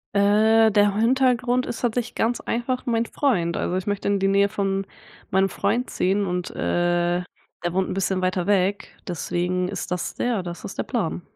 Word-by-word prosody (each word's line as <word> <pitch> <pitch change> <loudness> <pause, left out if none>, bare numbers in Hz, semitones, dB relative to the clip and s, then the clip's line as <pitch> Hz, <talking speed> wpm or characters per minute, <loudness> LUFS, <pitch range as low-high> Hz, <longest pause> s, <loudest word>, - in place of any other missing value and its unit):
Äh, 215 +2 +5
der 205 -1 +3
Hintergrund 250 +1 +2
ist 230 - -5
tatsächlich 240 -1 -1
ganz 235 +2 0
einfach 245 +2 -2
mein 230 0 +1
Freund. 180 - 0
Also, 180 - -1
ich 185 - -3
möchte 205 -1 -2
in 200 0 +2
die 195 - +2
Nähe 200 +1 +3
von 195 -1 -1 0.4
meinem 190 +1 +2
Freund 230 +5 -1
ziehen. 195 +2 +1
Und, 180 -1 -2
äh, 175 0 0 0.4
der 175 0 -1
wohnt 190 0 0
'n - - -2
bisschen 190 0 0
weiter 185 0 0
weg. 200 0 0
Deswegen 180 +1 -1
ist 195 -1 -5
das 180 -1 -3
ja, 240 -5 0
das 175 -1 -7
ist - - -7
der - - +1
Plan. 195 -8 -2
200 Hz, 185 wpm, -23 LUFS, 180-225 Hz, 0.4 s, Äh